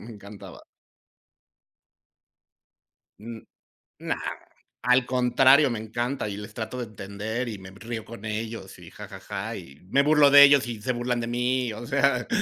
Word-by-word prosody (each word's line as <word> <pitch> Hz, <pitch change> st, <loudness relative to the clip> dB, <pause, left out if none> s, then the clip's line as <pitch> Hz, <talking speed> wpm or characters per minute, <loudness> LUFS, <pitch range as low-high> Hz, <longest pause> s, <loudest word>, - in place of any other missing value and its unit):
Me 115 Hz, -, -11 dB
encantaba. 100 Hz, 0 st, -12 dB, 2.6 s
Mm, 115 Hz, 0 st, -8 dB, 0.6 s
no, -, -, -2 dB, 0.7 s
al 125 Hz, 0 st, +3 dB
contrario, 130 Hz, +3 st, +4 dB
me 115 Hz, -, -3 dB
encanta 120 Hz, +3 st, -3 dB
y 100 Hz, -, -6 dB
les 105 Hz, +1 st, -9 dB
trato 110 Hz, +3 st, -6 dB
de 125 Hz, -, -4 dB
entender 110 Hz, +4 st, -5 dB
y 110 Hz, -3 st, -5 dB
me 95 Hz, 0 st, -12 dB
río 110 Hz, +3 st, -7 dB
con 115 Hz, -2 st, -11 dB
ellos 110 Hz, -2 st, -5 dB
y -, -, -13 dB
ja, -, -, -10 dB
ja, -, -, -11 dB
ja -, -, -6 dB
y 70 Hz, +1 st, -11 dB
me 140 Hz, +6 st, +3 dB
burlo 150 Hz, -1 st, +5 dB
de 140 Hz, 0 st, +9 dB
ellos 140 Hz, -3 st, +5 dB
y 115 Hz, -3 st, -6 dB
se 130 Hz, -, -1 dB
burlan 120 Hz, 0 st, -2 dB
de 115 Hz, -, -4 dB
mí, 125 Hz, 0 st, -1 dB
o 115 Hz, +3 st, -8 dB
sea, 140 Hz, -3 st, +1 dB
120 Hz, 165 wpm, -25 LUFS, 110-125 Hz, 2.6 s, de